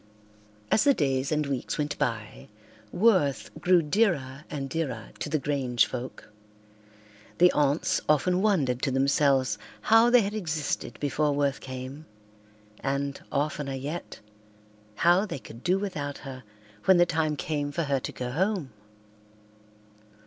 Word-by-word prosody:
As - - +4
the 280 -2 +5
days 135 -2 0
and 150 -1 +1
weeks 135 -3 -3
went 150 0 -1
by 110 -3 -3 0.4
Worth 150 - +2
grew 175 0 +4
dearer 150 -6 0
and 140 -2 -4
dearer 135 -6 -3
to - - -3
the 155 - +1
Grange 135 -5 +1
folk. 125 -3 -7 1.1
The 180 +1 +6
aunts 145 +1 +1
often 180 +5 +3
wondered 145 - +1
to - - +1
themselves 135 -3 +2 0.2
how 225 - +5
they 245 0 +6
had 205 0 -2
existed 160 -8 -3
before 145 +1 0
Worth 140 -1 0
came 130 +4 -8 0.7
and, 140 0 -2
oftener 145 -1 -1
yet, 145 +3 -6 0.7
how 175 - +3
they 170 - -4
could 120 -2 -12
do 180 +1 +2
without 150 -8 -4
her 130 -1 -8 0.4
when 190 - +6
the 175 - +6
time 160 -2 0
came 145 -1 -2
for 165 +4 -1
her 140 -2 0
to - - -5
go 125 -1 -5
home. 175 - -1
145 Hz, 140 wpm, -27 LUFS, 135-175 Hz, 1.1 s, The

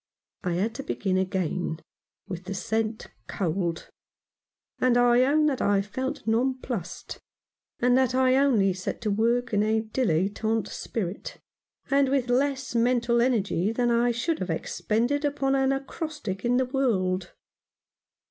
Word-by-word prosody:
I 180 - -1
had 200 +6 0
to 275 - -6
begin 190 -6 -1
again 185 -3 -2 0.5
with 185 -1 -6
the 195 +1 -4
scent 220 +3 -2 0.2
cold; 170 -2 -2 0.9
and 250 -1 +3
I 245 0 +5
own 305 +3 +3
that 280 -4 0
I 200 -1 +2
felt 260 +7 -4
nonplussed, 230 -6 -2 0.6
and 245 0 +3
that 255 -1 +2
I 260 0 +4
only 235 -9 +3
set 185 0 -4
to 215 -3 -1
work 235 +3 +1
in 205 - +3
a 220 +1 +2
dilettante 220 0 0
spirit, 200 -4 -5 0.5
and 275 -1 +4
with 260 -3 +1
less 270 +1 0
mental 235 0 +2
energy 210 -6 +1
than 240 +1 +1
I 235 +1 +3
should 240 +8 -1
have 185 - -4
expended 235 - -1
upon 285 -2 0
an 270 0 +2
acrostic 270 - -4
in 245 +1 +2
the 260 - +2
World. 190 -9 0
235 Hz, 140 wpm, -26 LUFS, 195-260 Hz, 0.9 s, I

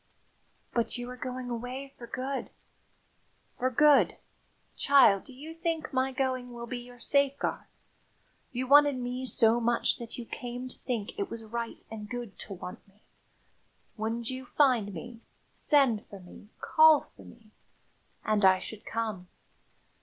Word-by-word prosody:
"But 235 0 0
you 245 0 -5
are - - -7
going 250 0 -5
away 255 +4 -5
for 235 - -10
good!" 260 +3 -3 1.1
"For 255 - +2
good! 290 +3 +5 0.6
Child, 245 -9 +5
do - - -12
you 290 +5 -9
think 330 -2 -3
my 260 0 +1
going 255 -1 -1
will 235 0 -6
be 245 +1 -5
your 245 0 -13
safeguard? 280 +2 +1 0.8
If - - -28
you 255 +1 -1
wanted 290 +1 +6
me 250 +1 -3
so 230 -1 +4
much 235 0 +1
that 235 -1 -7
you 240 - -6
came 245 +2 -6
to - - -12
think 240 - -4
it 400 - -1
was 230 -1 -7
right 230 +1 -5
and 210 -2 -7
good 240 -4 -6
to 200 - -7
want 180 +1 -9
me, 200 +2 -27 0.9
wouldn't 230 +2 -2
you 260 0 -6
find 245 -9 +3
me, 225 +6 -8 0.3
send 270 -8 +3
for 200 - -10
me, 180 +3 -14
call 315 -2 +6
for - - -14
me? 225 -2 -16 0.7
And 215 -1 +2
I 190 -1 +7
should 210 +3 -8
come. 215 -5 -3
245 Hz, 155 wpm, -29 LUFS, 225-265 Hz, 1.1 s, I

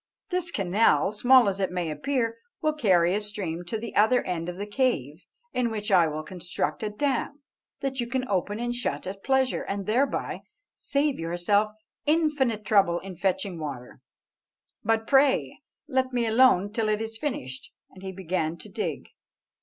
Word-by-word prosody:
This 360 -1 +1
canal, 200 - +2
small 245 +2 +5
as 195 0 -1
it 190 - +1
may 180 -3 -2
appear, 230 - -1 0.2
will 310 -1 +1
carry 185 - +3
a 210 - 0
stream 185 -5 -4
to 200 +6 -3
the 230 +2 -7
other 220 +4 +4
end 175 -1 -3
of 180 - -6
the 200 - -4
cave, 205 - -1 0.3
in 250 -2 +1
which 210 -2 -4
I 175 -4 +6
will 155 0 -4
construct 175 +1 -3
a 215 - -1
dam 280 +5 -2 0.4
that 270 -1 -2
you 240 - -1
can 255 +1 -2
open 205 +2 -1
and 240 0 -1
shut 245 0 -2
at 195 +1 -7
pleasure, 265 -1 +2
and 195 0 -4
thereby 250 +7 0 0.3
save 285 0 0
yourself 175 +6 +1 0.3
infinite 295 -9 +1
trouble 195 -5 +4
in 190 -1 -8
fetching 190 0 -1
water. 135 -5 -7 0.8
But 225 0 +1
pray 270 +1 +3 0.3
let 260 0 0
me 240 -1 +1
alone 220 -4 +4
till 225 -2 0
it 210 0 +1
is 225 0 -5
finished," 130 - -5 0.2
and 185 - -14
he 190 0 -5
began 175 -3 -2
to - - -12
dig. - - -4
210 Hz, 170 wpm, -26 LUFS, 180-255 Hz, 0.8 s, I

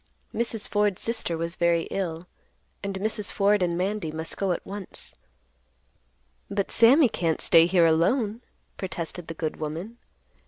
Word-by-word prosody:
Mrs. 230 -2 -1
Ford's 205 -2 +1
sister 225 -7 -1
was 170 +1 -3
very 170 -1 +2
ill, 170 -4 -3 0.6
and 200 -1 -4
Mrs. 210 +1 -1
Ford 205 0 +2
and 170 -1 0
Mandy 190 -2 -2
must 160 +1 -4
go 195 -2 -1
at 175 - -3
once. 200 -1 -7 1.4
"But 200 -1 -2
Sammy 255 +6 +6
can't 165 -7 -1
stay 165 0 +6
here 175 -2 +4
alone," 205 +8 +2 0.4
protested 175 -1 -5
the 165 - -6
good 155 -1 -3
woman. 165 +10 -6
190 Hz, 145 wpm, -26 LUFS, 165-210 Hz, 1.4 s, Sammy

